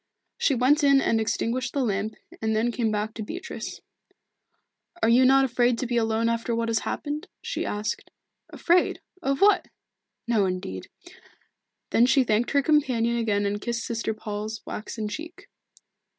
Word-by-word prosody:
She 275 - +2
went 275 +5 +3
in 280 -1 +6
and 225 -4 +1
extinguished 235 +3 -1
the 280 - +1
lamp, 205 0 -2 0.3
and 220 0 0
then 230 +2 +1
came 235 -2 0
back 215 +1 -2
to 225 - -6
Beatrice. 340 - -6 1.2
"Are - - +5
you 250 +3 +6
not 270 +1 +6
afraid 245 -1 +2
to 255 - -2
be 240 0 -2
alone 225 0 +1
after 230 0 -1
what 230 0 -1
has 225 - +2
happened?" 300 +5 -4 0.2
she - - -3
asked. 210 +1 -3 0.4
"Afraid? 350 +1 +2 0.2
Of 275 -3 -1
what? 410 +1 +5 0.6
No, 220 -4 +3
indeed." 140 - -5 1.0
Then 235 +2 +5
she 265 0 +4
thanked 225 0 +1
her 280 -1 +2
companion 255 -7 +2
again 210 -3 0
and 205 +1 -2
kissed 235 +1 -3
Sister 230 -1 -2
Paul's 215 +1 -5
waxen 215 0 -5
cheek. 335 - -8
235 Hz, 160 wpm, -26 LUFS, 220-270 Hz, 1.2 s, in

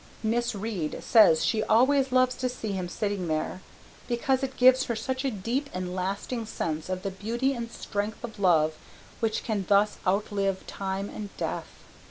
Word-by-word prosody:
Miss 235 +1 0
Reade 195 -7 -3
says 190 -9 +6
she 220 -2 +1
always 260 +5 +3
loves 255 0 +4
to 255 0 -1
see 225 -4 -4
him 185 -2 -3
sitting 200 -1 -2
there 155 +4 -2 0.5
because 260 +2 +1
it 270 -1 -4
gives 255 +1 +6
her 235 - -2
such 260 +4 -3
a 275 - +1
deep 245 +6 -2
and 180 0 -3
lasting 200 +5 -3
sense 160 -5 -3
of 185 0 -3
the 195 - -2
beauty 235 +8 -1
and 235 -2 -5
strength 210 +1 -4
of 220 -3 -7
love 160 -5 +4 0.5
which 225 -1 0
can 210 -4 -1
thus 205 +1 +3
outlive 195 0 0
time 195 0 -3
and 205 -1 -7
death. - - -3
215 Hz, 175 wpm, -27 LUFS, 190-245 Hz, 0.5 s, says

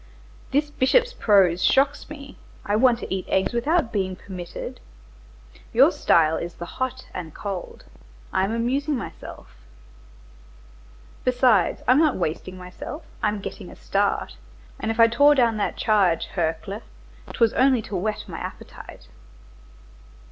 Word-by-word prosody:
"This 295 +2 0
bishop's 480 - +2
prose 195 - +3
shocks 275 +2 +2
me; 280 -2 -10 0.3
I 205 - 0
want 240 +1 +4
to - - -4
eat 190 -1 -4
eggs 190 +5 +1
without 245 +1 +1
being 190 -3 -1
permitted. 180 -2 -8 0.9
Your - - +6
style 160 -1 +3
is 170 0 -5
the 175 - -7
hot 255 +6 -4
and 165 -4 -7
cold; 195 -3 -6 0.5
I 190 - +2
am 195 - -1
amusing 265 +6 0
myself. 235 - -9 1.7
Besides, 250 -6 +2
I'm 255 +3 +5
not 310 -4 +3
wasting 185 +2 -3
myself, 185 - -8 0.2
I'm 210 -1 0
getting - - -7
a - - -12
start; - - -1 0.4
and 220 - -3
if 225 +1 -2
I 230 - +9
tore 285 +6 +5
down 235 -4 +2
that 205 - -2
charge, 195 -6 +2
Hercle! 175 +4 -2 0.5
'twas 230 -2 +2
only 260 -3 +3
to 200 - -6
whet 210 +4 -2
my - - -7
appetite." - - -10
225 Hz, 140 wpm, -24 LUFS, 185-260 Hz, 1.7 s, I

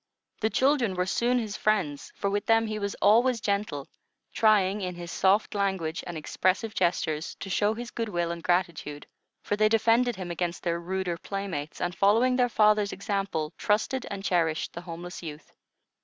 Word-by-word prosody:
The 220 - +1
children 260 -6 +2
were 180 0 0
soon 240 +6 +1
his 215 -4 -2
friends, 185 -10 0
for - - -2
with 205 +1 -1
them 225 0 +4
he 215 -1 -3
was 200 -1 -3
always 235 +4 +5
gentle, 200 -9 -2 0.5
trying 210 -2 +3
in 180 -1 -3
his 175 -1 -7
soft 195 +3 +2
language 190 -5 -1
and 175 -2 -5
expressive 185 +7 0
gestures 160 -4 0
to 195 - -7
show 210 +3 +2
his 240 +1 -7
good 230 -2 -3
will 175 -3 -1
and 170 0 -5
gratitude; 170 -4 -1 0.4
for 205 - 0
they 215 +1 +3
defended 230 +2 +3
him 185 -2 -5
against 175 0 -3
their 170 -1 0
ruder 180 0 -2
playmates, 185 -7 -5
and, 175 0 -1
following 225 +7 +3
their 250 -1 +3
father's 210 -2 +3
example, 195 -6 -2
trusted 225 +5 0
and 195 -1 -5
cherished 165 -4 0
the 170 - -6
homeless 175 0 -8
youth. 155 -3 -9
195 Hz, 175 wpm, -27 LUFS, 175-215 Hz, 0.5 s, always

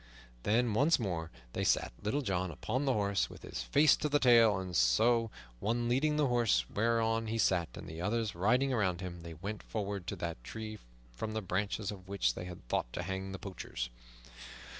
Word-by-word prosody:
Then 115 - +2
once 145 +9 +4
more 85 -8 -3 0.2
they - - -1
sat - - +2
Little 135 +8 -1
John 95 -4 0
upon 130 - -2
the 135 - +3
horse, 100 -3 +1
with - - -12
his - - -5
face 145 0 +5
to 150 - -1
the 145 - +4
tail, 115 -6 +6
and 95 -2 -5
so, 115 - +4 0.3
one 120 - 0
leading 140 +5 +2
the 150 - +3
horse 115 - +2
whereon 115 0 +1
he 115 +1 -1
sat 90 - +2
and - - -8
the 80 +2 -7
others 110 +2 0
riding 125 +9 +2
around 95 -7 +1
him, 90 -2 -6
they 85 -1 -8
went 100 +6 -5
forward 100 -3 -4
to - - -2
that 85 -8 -5
tree 110 - -6 0.3
from 85 - -5
the 110 - -1
branches 100 +2 -1
of 95 -2 -10
which 95 -12 +1
they 90 - -6
had 90 -8 -10
thought - - -1
to 90 - -3
hang 95 +1 -4
the 95 - -5
poachers. - - -5
105 Hz, 200 wpm, -33 LUFS, 90-115 Hz, 0.3 s, tail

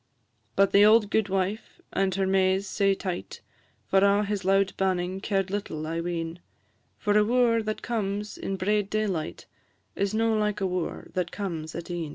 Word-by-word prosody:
But 195 0 +4
the 200 - +6
auld 215 0 +5
gudewife, 195 0 -1
and 195 -1 +1
her 195 0 +1
Mays 190 0 +2
sae 195 0 +2
tight, 185 -2 -5 0.4
For 195 - +3
a' 200 +1 +4
his 205 -1 -2
loud 195 +1 +2
banning 185 -1 -1
cared 195 -2 -1
little, 195 -6 -3
I 165 +1 -2
ween; 170 0 -4 0.6
For 205 -1 0
a 210 - +6
wooer 235 0 +3
that 215 0 -4
comes 210 -3 -2
in 195 - -4
braid 200 +1 0
daylight 200 -7 -2 0.5
Is 200 +1 -1
no 225 0 +2
like 210 -1 0
a 195 - 0
wooer 180 -2 -3
that 180 -2 -1
comes 165 -6 -5
at 170 +1 -6
e'en. 170 -3 -3
195 Hz, 175 wpm, -27 LUFS, 185-210 Hz, 0.6 s, the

